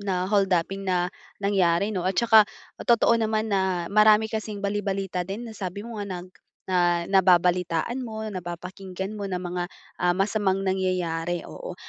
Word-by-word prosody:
na 185 -2 -1
hold-upping 195 -1 +1
na 180 -2 +1 0.3
nangyari 195 -2 +2
'no. 190 -5 -3
At 185 0 +1
saka 225 -2 +7 0.4
totoo 235 0 +4
naman, 220 -1 0
na 190 -4 0
marami 215 +1 +5
kasing 215 -2 -4
bali-balita 195 -2 -2
din 205 +6 -6
na 220 - -10
sabi 190 0 -5
mo 230 +1 -8
nga - - -2 0.2
nag 180 - -12 0.8
nababalitaan 180 +2 +3
mo, 220 -4 -5
napapakinggan 185 +2 -6
mo, 200 - -3
ng 180 -2 -3
mga, 175 0 -3 0.3
ah, 175 0 +2
masamang 195 0 +1
nangyayari, 180 -3 -1
oo. - - -8
195 Hz, 145 wpm, -25 LUFS, 180-210 Hz, 0.8 s, saka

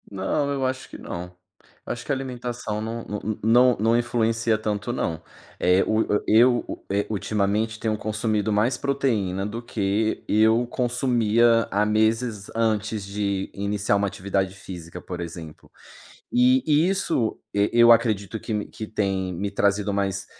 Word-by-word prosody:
Não, 105 +9 -1
eu 135 -2 -1
acho 130 0 -3
que - - -9
não. 85 +1 -6 0.6
Eu - - -2
acho 120 0 -9
que - - -3
a - - +2
alimentação 120 -5 -4
não 115 +1 -5 0.4
não 120 +3 +5
não 115 +2 +3
influencia 115 -1 +1
tanto 105 +1 -3
não. 80 -9 -2 0.4
Eh, 90 +2 +4
o 110 0 +2
o, 105 - 0
eh, 110 +3 +5
o 125 -1 +3
eu, - - -8
eh, 100 +1 +1
ultimamente 105 +2 -1
tenho 110 -1 -1
consumido 110 0 -1
mais 115 +5 +2
proteína 110 -9 -1
do 110 +3 -5
que 110 -1 -1
eu 110 +3 +3
consumia 120 -2 +2
há 105 +2 +2
meses 110 0 0
antes 110 -2 0
de 100 -1 -2
iniciar 100 0 0
uma 100 0 +1
atividade 95 0 -2
física, 85 -3 -9
por 90 -1 -6
exemplo. 85 -2 -9 0.6
E 125 +1 +4 0.3
isso 170 - 0
e 100 0 +2
eu 120 0 +7
acredito 110 -2 +2
que 105 -2 -3
que 110 - -8
tem 95 -3 -1
me 100 +4 -3
trazido 100 0 +1
mais, 100 -1 -1
110 Hz, 155 wpm, -24 LUFS, 100-120 Hz, 0.6 s, eu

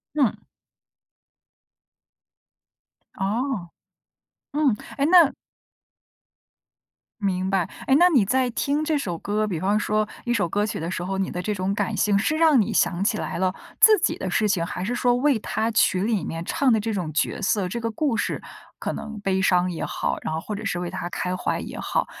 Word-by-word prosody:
嗯。 275 -7 +1 2.7
哦， 205 -2 -2 0.8
嗯， 290 -6 +2 0.2
诶， 280 - +1
那 335 -4 +7 1.9
明 185 -2 0
白， 190 -2 +1 0.2
唉， 265 - +4
那 355 +2 +7
你 265 - +4
在 255 +4 +1
听 285 +6 0
这 310 -1 +1
首 180 -11 -3
歌， 210 +4 -1
比 185 -6 -3
方 200 +3 +2
说 215 0 0 0.2
一 240 - 0
首 200 -7 +1
歌 205 +5 0
曲 215 - -4
的 165 +2 -3
时 175 - -3
候， 190 +1 -2
你 190 -1 -1
的 180 - -4
这 210 +3 -2
种 190 0 -1
感 215 +1 -1
性， 205 -1 +3
是 295 +10 0
让 315 -6 +5
你 205 - 0
想 175 +1 +1
起 215 +1 +1
来 - - -4
了 185 0 +1 0.3
自 430 -1 +8
己 - - 0
的 190 - -3
事 210 +3 +1
情， 185 -5 +1
还 180 - -4
是 240 +5 -2
说 245 0 +2
为 270 -1 +2
他 220 +2 -1
曲 190 -3 +2
里 210 -5 0
面 165 +1 -5
唱 270 +7 +1
的 220 - +3
这 225 +2 -2
种 180 -6 -3
角 150 0 -1
色， 200 -2 +1
这 235 +6 -4
个 230 0 -2
故 250 +2 0
事 - - -2 0.4
可 - - -3
能 220 -1 -7
悲 190 -1 0
伤 180 -1 +3
也 165 - -4
好， - - -2
然 155 - -3
后 160 - -2
或 210 - -5
者 210 +1 -6
是 175 - -1
为 175 -1 -4
他 175 - -4
开 180 +1 -3
怀 - - -2
也 - - -7
好， - - -1
210 Hz, 210 characters per minute, -24 LUFS, 185-245 Hz, 2.7 s, 自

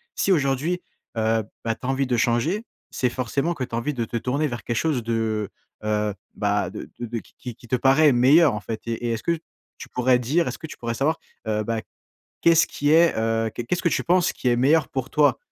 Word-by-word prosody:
si 195 - +1
aujourd'hui, 150 +3 +1 0.4
heu, 110 0 +2 0.2
bah, 115 - 0
tu 120 - -11
as - - -1
envie 135 0 0
de 125 - +1
changer, 120 - +1 0.3
c'est 125 - 0
forcément 135 +7 -1
que 130 -5 -3
tu 115 - -6
as - - 0
envie 145 +5 -1
de 120 -3 -2
te 120 - -7
tourner 130 +6 0
vers 120 -3 -6
quelque 120 -1 -2
chose 145 -8 0
de, 110 -2 -1 0.3
heu, 105 -1 0 0.2
bah, 105 0 0
de - - -8
de 120 -1 -3
qui 125 +2 -10
qui 120 - -16
te 125 - +1
paraît 135 +3 +5
meilleur, 135 +4 +5
en 105 - -4
fait. 110 +1 -5
Et 115 +1 -2
et - - 0
est-ce 115 - -3
que 170 -1 +1 0.4
tu - - -10
pourrais 125 0 +2
dire 150 +8 +1
est-ce - - -3
que 160 - -8
tu - - -10
pourrais 115 -1 -3
savoir, 150 +6 0 0.3
heu, 110 0 0
bah, 115 -1 -1 0.6
qu'est-ce 165 -1 +5
qui 145 +1 0
est, 165 +1 +5
heu 115 0 +1
qu'est 120 - -3
qu'est-ce 175 +8 -1
que 170 - +3
tu - - 0
penses 180 0 +2
qui 125 - -1
est 120 - +3
meilleur 150 +6 +3
pour 130 -1 -3
toi? 145 -4 +3
125 Hz, 235 wpm, -24 LUFS, 115-150 Hz, 0.6 s, paraît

